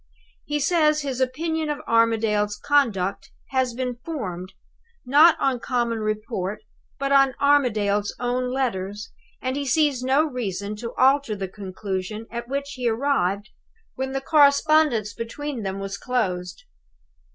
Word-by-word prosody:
He 295 Hz, 0 st, -1 dB
says 305 Hz, -1 st, +2 dB
his 265 Hz, -2 st, -3 dB
opinion 315 Hz, +4 st, -1 dB
of 295 Hz, -, -1 dB
Armadale's 220 Hz, -2 st, +2 dB
conduct 215 Hz, -10 st, +1 dB, 0.2 s
has 260 Hz, -3 st, 0 dB
been 250 Hz, -1 st, -3 dB
formed, 185 Hz, -, -5 dB, 0.5 s
not 300 Hz, +6 st, +6 dB
on 260 Hz, -2 st, +1 dB
common 235 Hz, -2 st, -1 dB
report, 215 Hz, -1 st, -3 dB, 0.3 s
but 275 Hz, +1 st, -2 dB
on 275 Hz, -1 st, +5 dB
Armadale's 215 Hz, -8 st, +2 dB
own 250 Hz, +1 st, -1 dB
letters, 210 Hz, -5 st, -3 dB, 0.3 s
and 255 Hz, +1 st, -1 dB
he 285 Hz, -, -2 dB
sees 285 Hz, -2 st, +2 dB
no 265 Hz, +4 st, +3 dB
reason 210 Hz, -, -4 dB
to 230 Hz, +1 st, -6 dB
alter 270 Hz, -3 st, +3 dB
the 195 Hz, -1 st, -4 dB
conclusion 195 Hz, +2 st, -5 dB
at 235 Hz, 0 st, -5 dB
which 280 Hz, +2 st, -3 dB
he 250 Hz, -4 st, -1 dB
arrived 220 Hz, -5 st, 0 dB, 0.4 s
when 265 Hz, 0 st, -3 dB
the 270 Hz, 0 st, -2 dB
correspondence 285 Hz, -6 st, +4 dB
between 250 Hz, +4 st, -5 dB
them 195 Hz, -1 st, -3 dB
was 195 Hz, 0 st, -5 dB
closed. 180 Hz, -8 st, -2 dB
245 Hz, 135 wpm, -24 LUFS, 210-280 Hz, 0.5 s, not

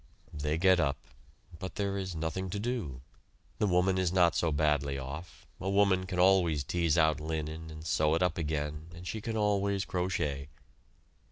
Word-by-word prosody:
They 75 Hz, +1 st, -1 dB
get 95 Hz, +1 st, +5 dB
up. 70 Hz, -5 st, +1 dB, 0.6 s
But 95 Hz, -, -6 dB
there 100 Hz, -1 st, -1 dB
is 95 Hz, -3 st, -3 dB
nothing 80 Hz, +4 st, -3 dB
to 100 Hz, -, -3 dB
do. 105 Hz, -, -3 dB, 0.6 s
The 105 Hz, -, +2 dB
woman 95 Hz, +1 st, +2 dB
is 90 Hz, -2 st, +1 dB
not 90 Hz, -2 st, +4 dB
so 85 Hz, -, +1 dB
badly 70 Hz, -2 st, +1 dB
off 70 Hz, +6 st, -8 dB
a 95 Hz, -, -2 dB
woman 100 Hz, -2 st, +3 dB
can 90 Hz, -1 st, -4 dB
always 90 Hz, -5 st, +4 dB
tease 85 Hz, +3 st, +1 dB
out 80 Hz, -3 st, +3 dB
linen 80 Hz, +1 st, -4 dB
and 80 Hz, 0 st, -9 dB
sew 75 Hz, 0 st, +2 dB
it 85 Hz, -, +1 dB
up 90 Hz, -, +1 dB
again, 75 Hz, 0 st, -3 dB
and 85 Hz, +1 st, -10 dB
she 110 Hz, -, -4 dB
can 110 Hz, +1 st, -3 dB
always 100 Hz, -2 st, +1 dB
crochet. 90 Hz, -7 st, -2 dB
85 Hz, 175 wpm, -31 LUFS, 75-95 Hz, 0.6 s, get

